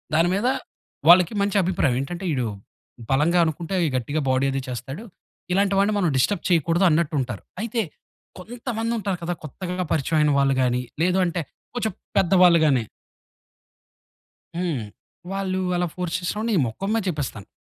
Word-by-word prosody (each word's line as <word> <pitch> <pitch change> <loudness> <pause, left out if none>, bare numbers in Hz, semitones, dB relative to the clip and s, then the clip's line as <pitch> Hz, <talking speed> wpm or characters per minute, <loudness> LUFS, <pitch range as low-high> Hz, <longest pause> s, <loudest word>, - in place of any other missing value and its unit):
దాని 165 +2 +4
మీద 210 +5 0 0.6
వాళ్లకి 180 +2 +7
మంచి 200 0 +1
అభిప్రాయం. 165 -8 +1
ఏంటంటే 175 +7 -5
ఈడు 125 -3 0 0.6
బలంగా 155 +6 +3
అనుకుంటే 165 +4 -3 0.2
గట్టిగా 145 +5 -1
బాడీ 130 +1 +2
అది 135 - -1
చేస్తాడు. 130 - -6 0.5
ఇలాంటి 195 +2 +2
వాడిని 200 +2 +3
మనం 180 -4 +2
డిస్టర్బ్ 160 +7 +1
చేయకూడదన్నట్టుంటారు. 165 - +1 0.2
అయితే 230 0 -1 0.6
కొంతమందుంటారు 225 -1 -3
కదా! 175 +1 -1
కొత్తగా 180 +4 -4
పరిచయమైన 150 0 +2
వాళ్ళు 140 0 +3
గాని 125 0 +1 0.2
లేదు 180 +2 +2
అంటే 170 0 -1 0.3
కొంచెం 225 -4 -1 0.3
పెద్దవాళ్ళు 180 -2 +5
గాని. 130 -6 +3 1.7
హ్మ్. 165 -10 -1 0.5
వాళ్ళు 195 -1 -2 0.2
అలా 175 0 +1
ఫోర్స్ 180 -2 -3
చేసినప్పుడు 210 +6 -3
నేను 185 -9 +3
మొఖం 190 - -4
మీద 225 -2 +1
చెప్పేస్తాను. 140 - -4
175 Hz, 135 wpm, -23 LUFS, 145-195 Hz, 1.7 s, వాళ్లకి